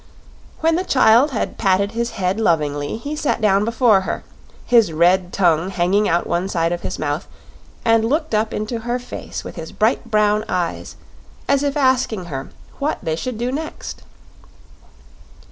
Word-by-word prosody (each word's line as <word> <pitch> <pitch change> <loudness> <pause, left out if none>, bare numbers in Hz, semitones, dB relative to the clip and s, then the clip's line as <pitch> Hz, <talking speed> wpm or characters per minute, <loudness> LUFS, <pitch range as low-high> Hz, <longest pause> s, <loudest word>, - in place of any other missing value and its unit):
When 325 +1 +3
the 365 - -1
child 255 -3 +5
had 240 -6 -3
patted 200 0 +2
his 235 +1 -2
head 190 +1 -1
lovingly, 150 -4 0
he 285 +6 -5
sat 300 -4 -1
down 205 -2 +3
before 230 -3 +3
her, - - -4 0.4
his 230 -7 +4
red 175 +3 +3
tongue 175 -2 +2
hanging 195 +3 +1
out 170 +1 +1
one 175 +3 -1
side 165 -3 0
of 175 0 -2
his - - -4
mouth, 150 +3 -3 0.6
and 225 -1 +4
looked 300 +4 -1
up 215 +1 +1
into 215 +2 -3
her 240 +2 -2
face 250 - -7
with - - -9
his 160 -1 -7
bright 225 +2 0
brown 210 -1 +2
eyes, 175 -2 -3 0.5
as 280 0 +3
if 285 0 -1
asking 260 -8 +1
her 135 0 -5 0.3
what 290 +2 -1
they 160 - -1
should 245 +7 -4
do 240 +2 -2
next. 310 +3 -6
215 Hz, 165 wpm, -20 LUFS, 180-245 Hz, 0.6 s, child